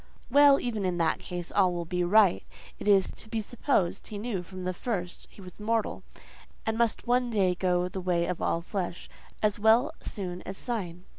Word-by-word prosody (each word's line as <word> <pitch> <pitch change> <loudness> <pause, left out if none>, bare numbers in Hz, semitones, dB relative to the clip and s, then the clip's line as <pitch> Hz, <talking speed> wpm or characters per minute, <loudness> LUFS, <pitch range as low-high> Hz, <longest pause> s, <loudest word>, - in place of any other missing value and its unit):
Well, 285 0 +7
even 220 -4 -2
in 180 -2 0
that 165 -2 +1
case, 175 -1 -6
all 185 -3 +3
will 170 -1 -3
be 180 +1 -1
right: 195 +1 +4 0.4
it - - -6
is 195 -2 +4
to 220 - -12
be 225 - -1
supposed 215 -4 -1
he 210 - -6
knew 205 -3 -3
from 185 +1 -9
the 185 0 -1
first 180 -3 -4
he - - -15
was 180 +1 -12
mortal, 225 +1 -1 0.6
and 220 - 0
must 230 -1 +1
one 245 0 +2
day 195 -5 +2
go 180 0 +1
the 185 +1 -5
way 175 -2 +1
of 180 -1 -3
all 165 - 0
flesh, 180 -1 -4 0.4
"As 210 -1 +2
well 230 +8 +4
soon 180 -3 -5
as 190 - -7
syne." 185 -8 -4
195 Hz, 200 wpm, -28 LUFS, 180-220 Hz, 0.6 s, Well